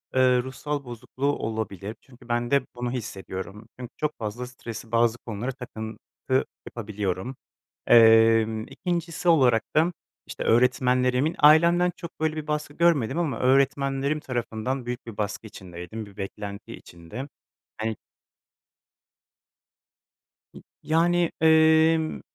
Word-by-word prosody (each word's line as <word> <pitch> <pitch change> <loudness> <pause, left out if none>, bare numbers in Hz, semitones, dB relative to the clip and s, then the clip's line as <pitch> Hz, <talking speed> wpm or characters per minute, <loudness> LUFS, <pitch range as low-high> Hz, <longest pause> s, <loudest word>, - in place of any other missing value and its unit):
ııı, 125 -1 +4
ruhsal 145 +3 -4
bozukluğu 120 +3 -6
olabilir 110 -2 -4
çünkü 125 -2 -19
ben 120 0 -1
de 140 0 +4
bunu 120 0 -3
hissediyorum. 100 -2 -6
Çünkü 125 -2 -7
çok 155 0 -2
fazla 115 +3 -4
stresi 115 -2 -9
bazı 115 0 +3
konulara 115 +2 -5
takıntı 120 +1 -4 0.2
yapabiliyorum. 105 +1 -4 0.5
Emm, 115 -1 +6
2'ncisi 175 -1 -2
olarak 130 -9 +4
da 165 +3 +3 0.3
işte - - -5
öğretmenlerimin 125 +4 +2
ailemden 170 +4 +6
çok 170 - -10
böyle 155 0 0
bir 155 0 -5
baskı 150 -1 -3
görmedim 160 -5 +2
ama 145 -10 -1
öğretmenlerim 135 +2 +2
tarafından 125 -1 -3
büyük 120 0 -5
bir 115 -3 -9
baskı 105 +1 -3
içindeydim, 95 +3 -8
bir 100 -1 -16
beklenti 100 0 -7
içinde. 85 +11 -9 0.5
Hani 110 0 -2 2.6
N - - -13 0.2
yani, 170 +2 +2
emm, 160 0 +4
125 Hz, 115 wpm, -25 LUFS, 110-150 Hz, 2.6 s, Emm